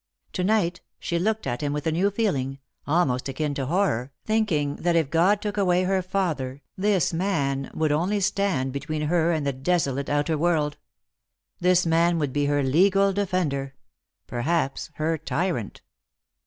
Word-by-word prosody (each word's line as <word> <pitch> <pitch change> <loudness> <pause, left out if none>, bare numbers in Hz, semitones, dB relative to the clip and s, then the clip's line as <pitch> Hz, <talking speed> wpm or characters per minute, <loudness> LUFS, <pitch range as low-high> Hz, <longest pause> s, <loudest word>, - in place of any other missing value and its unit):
To 180 - -1
night 185 -3 +1 0.2
she 170 - -2
looked 220 +4 0
at 120 -2 -2
him 145 -1 -1
with 150 +2 -3
a 160 - +2
new 180 +5 +2
feeling, 155 - -1 0.3
almost 140 -5 +1
akin 145 +2 -2
to 135 -2 -3
horror, 145 - 0
thinking 175 -10 0
that 175 -1 +1
if 160 -4 +1
God 190 +5 +3
took 210 0 -3
away 180 -2 +3
her 190 0 +1
father 165 -8 -2
this 190 -3 +1
man 145 -7 -1
would 155 -1 +1
only 180 +8 +1
stand 190 -9 0
between 150 +2 -3
her 165 +2 +2
and 155 -3 -1
the 140 - 0
desolate 140 -1 0
outer 145 +1 0
world. 155 -3 +1 0.8
This 180 0 +3
man 170 +1 +3
would 145 -5 -1
be 145 -1 +1
her 145 -1 +1
legal 195 +8 +3
defender: 160 -9 -1 0.5
perhaps 135 +4 -1
her 160 +1 -1
tyrant. 160 - -2
165 Hz, 160 wpm, -25 LUFS, 140-185 Hz, 0.8 s, God